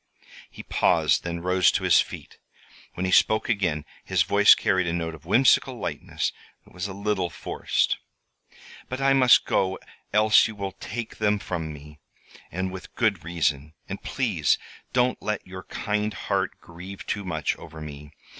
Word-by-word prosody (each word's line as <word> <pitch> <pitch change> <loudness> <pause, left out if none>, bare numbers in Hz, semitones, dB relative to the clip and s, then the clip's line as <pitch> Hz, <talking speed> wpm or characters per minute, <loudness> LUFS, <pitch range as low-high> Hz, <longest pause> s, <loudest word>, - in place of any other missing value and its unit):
He - - -10
paused, - - +2
then 85 0 -4
rose 90 0 +3
to - - -1
his - - +6
feet. - - -9 0.6
When 90 - -2
he 95 - -1
spoke 110 +3 +4
again 90 -9 0 0.2
his 95 -4 +2
voice 100 +5 +6
carried 95 -2 +1
a 85 - -1
note 80 -1 -2
of 80 0 -13
whimsical 125 +7 +4
lightness - - -3 0.3
that - - -20
was 90 +3 -4
a 100 - -7
little 100 -2 -1
forced. 75 - -1 0.9
"But 130 - -4
I 135 0 +4
must 130 -2 +6
go 95 0 +1 0.3
else 105 +1 +5
you 110 - -8
will 100 -1 -4
take 115 +4 -7
them 105 -1 +2
from 85 -5 -4
me, 75 0 -12 0.5
and 95 +1 -2
with 95 -1 -10
good 105 -8 +1
reason. 80 -3 -1
And 100 - -6
please 105 - +1 0.3
don't 125 0 +1
let 105 -1 -3
your 95 0 -9
kind 105 0 -2
heart - - -2
grieve 90 +3 -10
too 100 - -3
much 80 -6 -1
over 80 - -11
me. 75 -1 -9
95 Hz, 165 wpm, -25 LUFS, 85-105 Hz, 0.9 s, his